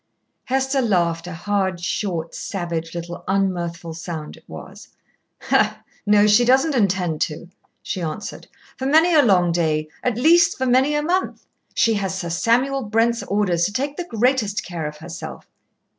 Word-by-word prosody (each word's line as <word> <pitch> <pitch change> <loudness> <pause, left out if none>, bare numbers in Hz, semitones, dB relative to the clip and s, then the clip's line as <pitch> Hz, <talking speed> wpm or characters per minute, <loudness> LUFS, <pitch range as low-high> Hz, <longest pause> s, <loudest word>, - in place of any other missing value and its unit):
Hester 265 +1 0
laughed, 170 -6 0
a 180 - -6
hard, 190 0 -1
short, 170 -2 -3
savage 170 -3 -4
little 170 0 -6
un 195 0 +2
mirthful 170 -1 -5
sound 160 -2 -6
it - - -19
was. - - -10 1.2
"No, 205 0 +5
she 210 +3 +5
doesn't 265 +5 +3
intend 185 - 0
to," 165 +3 -3 0.3
she 185 - -4
answered, 165 +5 -5 0.3
"for 265 - -2
many 320 +5 +4
a 305 - +7
long 185 -8 +3
day, 155 -2 0
at 245 -3 -1
least, 335 +6 +4
for 260 - -1
many 260 +4 +3
a 295 - 0
month. 360 +4 -1 0.3
She 225 - +3
has 195 -2 -2
Sir 170 -3 -4
Samuel 250 +9 +1
Brent's 230 +1 +1
orders 195 -4 0
to 205 - -3
take 280 +5 -2
the 355 - -3
greatest 225 -2 +1
care 170 -4 -4
of 150 0 -8
herself." 170 +3 -8
200 Hz, 160 wpm, -21 LUFS, 170-250 Hz, 1.2 s, a